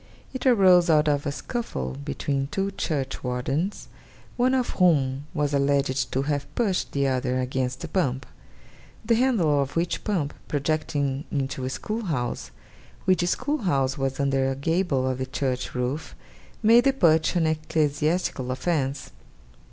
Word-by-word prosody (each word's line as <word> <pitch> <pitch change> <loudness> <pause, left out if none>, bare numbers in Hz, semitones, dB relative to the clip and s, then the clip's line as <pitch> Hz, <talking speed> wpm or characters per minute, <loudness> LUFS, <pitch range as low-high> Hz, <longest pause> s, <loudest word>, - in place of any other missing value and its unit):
It 260 0 -2
arose 185 -7 +6
out 155 -1 +4
of 145 0 +1
a - - 0
scuffle 105 - -4
between 135 - -2
two 195 +6 -2
churchwardens, 135 +1 -2 0.5
one 255 +1 +2
of 255 -2 0
whom 140 -5 +3
was 145 -4 -1
alleged 140 -2 +1
to 135 - +1
have 145 0 -2
pushed 205 -6 0
the 140 0 +1
other 130 -1 0
against 130 +1 -2
a - - -3
pump; 135 -7 -1 0.8
the 230 - +3
handle 215 - +3
of 135 0 -4
which 170 +1 -1
pump 165 -9 -1
projecting 145 -1 -1
into 135 -2 -2
a - - -2
school 215 - -4
house, 125 -9 -2 0.6
which 185 -2 +3
school 290 +11 0
house 135 - +1
was 135 -1 -2
under 135 -1 +1
a 135 - -2
gable 140 -2 0
of 130 0 -2
the 130 - -2
church 130 -2 -2
roof, 125 +5 -3 0.5
made 230 +3 +6
the 275 - +4
push 160 -9 +3
an 170 -2 +2
ecclesiastical 155 -2 0
offence. 135 - -1
145 Hz, 150 wpm, -25 LUFS, 135-175 Hz, 0.8 s, arose